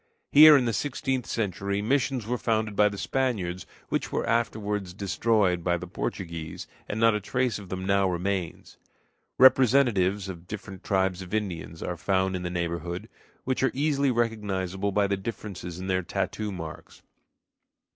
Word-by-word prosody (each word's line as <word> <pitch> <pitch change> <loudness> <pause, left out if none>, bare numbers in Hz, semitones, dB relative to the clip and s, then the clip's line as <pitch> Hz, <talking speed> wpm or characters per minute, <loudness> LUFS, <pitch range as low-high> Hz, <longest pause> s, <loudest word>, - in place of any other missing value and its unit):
Here 150 0 +10
in 130 - +1
the 115 - 0
sixteenth 130 -1 -2
century 100 -2 -2
missions 130 +1 0
were 120 +2 -2
founded 110 -2 0
by 105 0 +5
the 100 - -7
Spaniards, 100 -9 -2 0.2
which - - -2
were - - -1
afterward 105 -4 -1
destroyed 100 -3 +1
by 90 0 +1
the 90 - -7
Portuguese, 85 -2 -5 0.2
and 105 - -2
not 115 0 +5
a 105 - 0
trace 125 +1 -1
of 100 -3 -11
them 95 0 -4
now 100 0 +3
remains. 90 0 -3 0.6
Representatives 120 -7 +4
of 90 -2 -8
different 100 -2 -8
tribes 95 -1 0
of 95 +3 -5
Indians 85 -6 -4
are 90 - -3
found 95 +1 0
in 90 - -3
the 90 - -3
neighborhood, 85 0 -3 0.3
which 130 0 -1
are 135 - +3
easily 140 -1 +2
recognizable 100 -5 -1
by 100 +1 +2
the 100 0 0
differences 95 -4 -6
in 95 - -6
their 95 -1 +1
tattoo 100 +3 -3
marks. 80 -4 -9
100 Hz, 160 wpm, -27 LUFS, 90-115 Hz, 0.6 s, Here